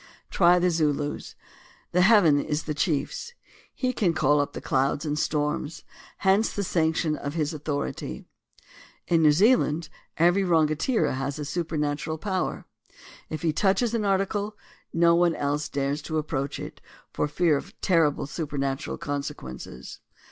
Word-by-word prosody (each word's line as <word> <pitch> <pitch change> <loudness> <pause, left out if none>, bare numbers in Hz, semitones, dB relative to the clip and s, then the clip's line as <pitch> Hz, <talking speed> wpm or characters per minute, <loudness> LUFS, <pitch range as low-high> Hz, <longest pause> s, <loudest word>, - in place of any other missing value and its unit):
Try 175 -1 +5
the 180 0 +2
Zulus: 150 -3 -1 0.6
"The 180 - +3
heaven 180 -8 +5
is 150 0 -2
the 155 - -3
chief's"; 155 - -2 0.4
he 255 -1 -2
can 180 -8 +1
call 145 0 +3
up 145 - -4
clouds 135 +3 0
and 150 - -1
storms, 150 +1 -2 0.3
hence 195 +3 +2
the 205 - -2
sanction 160 -3 +1
of 145 +1 -5
his 155 -1 -1
authority. 145 -1 -4 0.8
In 165 -1 +3
New 155 -1 +6
Zealand, 165 - +3 0.3
every 175 +4 +4
Rangatira 160 - +2
has 135 +2 -3
a 150 - -4
supernatural 155 -1 -2
power. 185 +2 -2 0.6
If 155 - -5
he 160 -2 +1
touches 200 +6 +2
an 230 -2 0
article, 200 +1 0 0.3
no 170 0 +4
one 170 -1 +3
else 145 +1 -1
dares 140 +1 -1
to 160 +1 -3
approach 145 -3 -2
it, - - -8 0.3
for - - 0
fear 155 +1 +2
of 195 +9 -6
terrible 165 -6 +2
supernatural 140 -3 -3
consequences. 140 - -6
155 Hz, 140 wpm, -26 LUFS, 145-180 Hz, 0.8 s, New